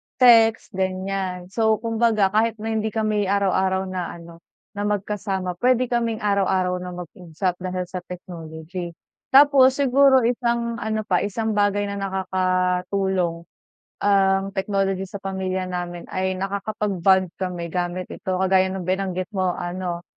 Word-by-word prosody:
text, 225 Hz, -3 st, +5 dB
ganyan. 185 Hz, -1 st, -3 dB
So, 220 Hz, 0 st, +2 dB
kumbaga 225 Hz, -3 st, +1 dB
kahit 225 Hz, +1 st, +2 dB
na 220 Hz, +1 st, -4 dB
hindi 220 Hz, 0 st, 0 dB
kami 215 Hz, -2 st, 0 dB
araw-araw 190 Hz, -1 st, +1 dB
na 180 Hz, -2 st, -4 dB
ano, 170 Hz, 0 st, -12 dB, 0.3 s
na 205 Hz, 0 st, -3 dB
magkasama, 195 Hz, -3 st, -2 dB
pwede 250 Hz, -1 st, +2 dB
kaming 230 Hz, -2 st, -1 dB
araw-araw 190 Hz, -3 st, +1 dB
na 180 Hz, 0 st, -6 dB
mag-usap 180 Hz, +1 st, -4 dB
dahil 185 Hz, 0 st, -3 dB
sa 185 Hz, 0 st, -5 dB
technology. 170 Hz, 0 st, -7 dB, 0.4 s
Tapos 270 Hz, -1 st, +7 dB
siguro 270 Hz, -1 st, +4 dB
isang 235 Hz, -1 st, 0 dB
ano 220 Hz, -1 st, -2 dB
pa, 180 Hz, -3 st, +1 dB
isang 220 Hz, +2 st, -2 dB
bagay 205 Hz, -1 st, +1 dB
na 200 Hz, -, -4 dB
nakakatulong 185 Hz, -1 st, 0 dB, 0.6 s
ang 195 Hz, -1 st, +3 dB
technology 195 Hz, -1 st, -1 dB
sa 200 Hz, +1 st, -9 dB
pamilya 190 Hz, -1 st, -3 dB
namin 175 Hz, -1 st, -4 dB
ay 185 Hz, 0 st, -1 dB
nakakapag-bond 195 Hz, -2 st, 0 dB
kami 175 Hz, -3 st, -4 dB
gamit 180 Hz, +1 st, -3 dB
ito. 190 Hz, -4 st, -4 dB
Kagaya 190 Hz, 0 st, +4 dB
ng 190 Hz, -, -4 dB
binanggit 185 Hz, 0 st, -2 dB
mo 185 Hz, -3 st, 0 dB
ano, 175 Hz, 0 st, -4 dB
190 Hz, 135 wpm, -23 LUFS, 185-215 Hz, 0.6 s, Tapos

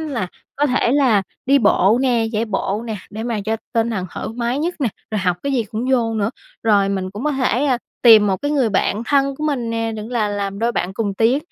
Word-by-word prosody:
là 275 Hz, -12 st, -3 dB, 0.3 s
có 290 Hz, -, +2 dB
thể 250 Hz, -3 st, +1 dB
là 255 Hz, -8 st, +3 dB, 0.2 s
đi 280 Hz, +1 st, +5 dB
bộ 220 Hz, -2 st, +4 dB
nè, 240 Hz, -4 st, +2 dB
chạy 220 Hz, +1 st, 0 dB
bộ 205 Hz, 0 st, -2 dB
nè, 220 Hz, -, -3 dB
để 220 Hz, +1 st, -6 dB
mà 230 Hz, -2 st, -2 dB
cho 220 Hz, +1 st, 0 dB, 0.2 s
tinh 230 Hz, 0 st, +1 dB
thần 190 Hz, -5 st, -3 dB
thoải -, -, -5 dB
mái 240 Hz, +2 st, -1 dB
nhất 340 Hz, +4 st, -1 dB
nè, 260 Hz, -, +2 dB, 0.2 s
rồi 215 Hz, -, -1 dB
học 180 Hz, -2 st, 0 dB
cái 280 Hz, -, -1 dB
gì 245 Hz, -4 st, +2 dB
cũng 225 Hz, +4 st, -3 dB
vô 235 Hz, -3 st, +2 dB
nữa. 215 Hz, 0 st, 0 dB, 0.3 s
Rồi 205 Hz, -3 st, +3 dB
mình 190 Hz, -1 st, -2 dB
cũng 210 Hz, +8 st, -7 dB
có 300 Hz, -, +2 dB
thể, 260 Hz, -1 st, +1 dB
ơ, 265 Hz, -4 st, +2 dB, 0.3 s
tìm 220 Hz, -3 st, +8 dB
1 190 Hz, -2 st, +1 dB
cái 290 Hz, -, -3 dB
người 275 Hz, -6 st, +2 dB
bạn 205 Hz, +1 st, 0 dB
thân 275 Hz, +2 st, +2 dB
của 305 Hz, -, -4 dB
mình 260 Hz, -6 st, -1 dB
nè, 225 Hz, 0 st, -1 dB
đừng 215 Hz, 0 st, -6 dB
là 225 Hz, -4 st, 0 dB
làm 200 Hz, -1 st, -3 dB
đôi 230 Hz, +2 st, 0 dB
bạn 185 Hz, -4 st, -2 dB
cùng 205 Hz, -1 st, -2 dB
tiến 230 Hz, +6 st, +3 dB
225 Hz, 250 wpm, -20 LUFS, 205-260 Hz, 0.3 s, tìm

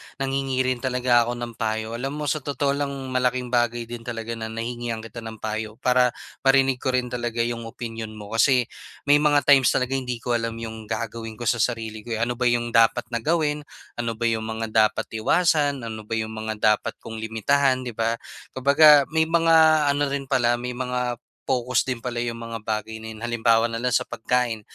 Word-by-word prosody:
nanghingi 135 Hz, -1 st, -1 dB
rin 130 Hz, -1 st, -1 dB
talaga 125 Hz, -2 st, +2 dB
ako 120 Hz, -, -2 dB
ng 120 Hz, -1 st, -6 dB
payo. 110 Hz, +1 st, -2 dB
Alam 135 Hz, +3 st, -3 dB
mo, 145 Hz, -, 0 dB
sa 155 Hz, -, -1 dB
totoo 140 Hz, -1 st, -1 dB
lang, 140 Hz, 0 st, -1 dB, 0.2 s
malaking 125 Hz, -1 st, 0 dB
bagay 120 Hz, -1 st, +1 dB
din 115 Hz, 0 st, -9 dB
talaga 115 Hz, -1 st, -4 dB
na 110 Hz, -, -4 dB
nahingian 115 Hz, 0 st, -4 dB
kita 115 Hz, +1 st, -8 dB
ng 110 Hz, -1 st, -7 dB
payo 110 Hz, 0 st, -4 dB
para 125 Hz, -1 st, +3 dB, 0.3 s
marinig 135 Hz, -1 st, +4 dB
ko 130 Hz, 0 st, 0 dB
rin 125 Hz, -1 st, -1 dB
talaga 120 Hz, -1 st, -1 dB
yung 115 Hz, -1 st, -3 dB
opinyon 115 Hz, -1 st, -7 dB
mo. 105 Hz, -1 st, -10 dB
Kasi 125 Hz, +2 st, +4 dB, 0.4 s
may 145 Hz, +1 st, +5 dB
mga 145 Hz, -1 st, +3 dB
times 135 Hz, -3 st, +6 dB
talaga 135 Hz, +1 st, +1 dB
hindi 125 Hz, -1 st, -3 dB
ko 125 Hz, -, -2 dB
alam 115 Hz, -1 st, -1 dB
yung 110 Hz, -1 st, -7 dB
gagawin 115 Hz, -1 st, -4 dB
ko 120 Hz, -, -8 dB
sa 120 Hz, 0 st, +1 dB
sarili 110 Hz, -2 st, -1 dB
ko, 115 Hz, -, -2 dB
eh. 115 Hz, -, 0 dB
Ano 120 Hz, +1 st, -2 dB
ba 125 Hz, -, +2 dB
yung 120 Hz, 0 st, +1 dB
dapat 115 Hz, +1 st, +4 dB
na 120 Hz, -, -1 dB
gawin? 150 Hz, +1 st, 0 dB, 0.3 s
Ano 115 Hz, -1 st, -2 dB
ba 115 Hz, -, -6 dB
yung 110 Hz, -1 st, 0 dB
mga 110 Hz, 0 st, -4 dB
dapat 110 Hz, -1 st, +2 dB
iwasan? 145 Hz, +3 st, +2 dB
Ano 110 Hz, -2 st, -7 dB
ba 115 Hz, -, -2 dB
yung 110 Hz, 0 st, -2 dB
mga 110 Hz, 0 st, -4 dB
dapat 105 Hz, +1 st, +1 dB
kong 110 Hz, 0 st, -7 dB
limitahan, 130 Hz, +4 st, +1 dB
'di 125 Hz, -, -4 dB
ba? 115 Hz, +1 st, 0 dB, 0.4 s
Kumbaga 140 Hz, +2 st, +7 dB
may 160 Hz, 0 st, +2 dB
mga 165 Hz, 0 st, +4 dB, 0.4 s
ano 145 Hz, 0 st, +1 dB
rin 140 Hz, 0 st, -2 dB
pala, 125 Hz, -3 st, +2 dB
may 120 Hz, +1 st, -3 dB
mga 125 Hz, -1 st, -2 dB, 0.3 s
pokus 125 Hz, -1 st, +2 dB
din 130 Hz, -, -1 dB
pala 120 Hz, -1 st, -3 dB
'yong 120 Hz, -1 st, -2 dB
mga 115 Hz, 0 st, -6 dB
bagay 110 Hz, 0 st, -3 dB
na 110 Hz, -, -8 dB
'yon. 110 Hz, +1 st, -9 dB
Halimbawa 115 Hz, -1 st, +3 dB
na 115 Hz, -, -3 dB
lang 125 Hz, -, +1 dB
sa -, -, +2 dB
pagkain. 115 Hz, -1 st, -1 dB
120 Hz, 205 wpm, -24 LUFS, 115-130 Hz, 0.4 s, Kumbaga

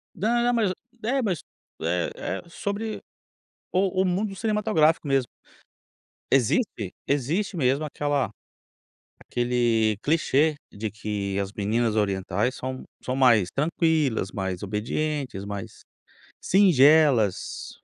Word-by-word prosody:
Não 235 Hz, +6 st, +1 dB
não, 245 Hz, 0 st, +2 dB
mas 220 Hz, -5 st, +2 dB, 0.3 s
é, 265 Hz, +4 st, +1 dB
mas, 190 Hz, -, -1 dB, 0.4 s
eh 85 Hz, +2 st, 0 dB
eh, 95 Hz, +2 st, -4 dB
sobre 205 Hz, +5 st, -4 dB, 0.7 s
o 190 Hz, 0 st, +1 dB
o 190 Hz, -, +2 dB
mundo 195 Hz, +3 st, -1 dB
cinematográfico, 205 Hz, -8 st, +2 dB
mesmo. 135 Hz, -2 st, +2 dB, 1.1 s
Existe. 120 Hz, -, +1 dB
Existe 155 Hz, -, -1 dB
mesmo 135 Hz, +1 st, +2 dB
aquela 145 Hz, -2 st, -1 dB, 0.9 s
aquele 120 Hz, -3 st, +1 dB
clichê 155 Hz, 0 st, +2 dB, 0.2 s
de 105 Hz, +1 st, -4 dB
que 100 Hz, -2 st, -3 dB
as 100 Hz, +1 st, -3 dB
meninas 110 Hz, +2 st, 0 dB
orientais 100 Hz, +3 st, 0 dB
são 130 Hz, 0 st, -5 dB, 0.2 s
são 130 Hz, -, -2 dB
mais 115 Hz, -9 st, +4 dB
tranquilas, 150 Hz, -, +1 dB
mais 95 Hz, -2 st, -3 dB
obedientes, 115 Hz, +2 st, -2 dB
mais 100 Hz, -1 st, -7 dB, 0.6 s
singelas. 150 Hz, -, +4 dB
135 Hz, 110 wpm, -25 LUFS, 105-175 Hz, 1.1 s, mais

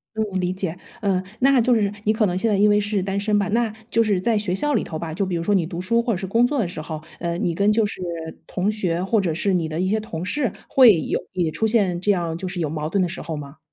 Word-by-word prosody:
嗯， 210 Hz, -4 st, -1 dB
理 180 Hz, 0 st, 0 dB
解， 185 Hz, -3 st, -3 dB, 0.2 s
呃， 195 Hz, -4 st, +1 dB, 0.2 s
那 270 Hz, 0 st, +5 dB
就 240 Hz, +1 st, +3 dB
是- 205 Hz, -3 st, +1 dB
你 215 Hz, -, +3 dB
可 220 Hz, -1 st, +2 dB
能 180 Hz, -1 st, -1 dB
现 225 Hz, +4 st, +1 dB
在 205 Hz, -, +2 dB
因 205 Hz, +2 st, +4 dB
为 205 Hz, 0 st, +4 dB
是 205 Hz, -1 st, -1 dB
单 195 Hz, +1 st, -2 dB
身 210 Hz, 0 st, +1 dB
吧- 200 Hz, -, 0 dB
那 230 Hz, -1 st, +1 dB, 0.2 s
就 230 Hz, -, +3 dB
是 205 Hz, -4 st, +1 dB
在 225 Hz, +3 st, +1 dB
学 205 Hz, -3 st, +1 dB
校 295 Hz, +8 st, +1 dB
里 -, -, +2 dB
头 160 Hz, -, -5 dB
吧， 160 Hz, -1 st, -5 dB
就 195 Hz, +3 st, 0 dB
比 180 Hz, -2 st, -2 dB
如 165 Hz, -, -2 dB
说 205 Hz, +4 st, +1 dB
你 185 Hz, -4 st, +2 dB
读 170 Hz, 0 st, -5 dB
书 230 Hz, +6 st, +1 dB
或 235 Hz, -1 st, 0 dB
者 -, -, 0 dB
是 190 Hz, -, -4 dB
工 230 Hz, +5 st, +3 dB
作 285 Hz, +2 st, -1 dB
的 220 Hz, -, +1 dB
时 170 Hz, -2 st, -6 dB
候， 155 Hz, 0 st, -6 dB, 0.2 s
呃， 170 Hz, 0 st, -2 dB
你 170 Hz, -, 0 dB
跟 200 Hz, +4 st, +2 dB
就 220 Hz, +1 st, +3 dB
是 190 Hz, -, -6 dB, 0.4 s
同 190 Hz, +2 st, -1 dB
学 180 Hz, -5 st, -1 dB
或 215 Hz, +3 st, +2 dB
者 180 Hz, -4 st, 0 dB
是 195 Hz, +4 st, 0 dB
你 170 Hz, -3 st, 0 dB
的 155 Hz, +1 st, -4 dB
一 185 Hz, -, +1 dB
些 215 Hz, +2 st, +1 dB
同 175 Hz, -5 st, -6 dB
事 255 Hz, +4 st, -1 dB, 0.2 s
会 230 Hz, -10 st, +6 dB
有 -, -, -1 dB
也 175 Hz, -3 st, 0 dB
出 220 Hz, -, 0 dB
现 200 Hz, -6 st, +2 dB
这 205 Hz, -, +1 dB
样 170 Hz, -3 st, -2 dB
就 185 Hz, +2 st, -4 dB
是 180 Hz, 0 st, -5 dB
有 160 Hz, -, 0 dB
矛 155 Hz, 0 st, -3 dB
盾 195 Hz, +4 st, 0 dB
的 180 Hz, -, +1 dB
时 170 Hz, -, -6 dB
候 160 Hz, -2 st, -4 dB
吗？ 140 Hz, 0 st, -9 dB
195 Hz, 325 characters per minute, -22 LUFS, 175-215 Hz, 0.4 s, 会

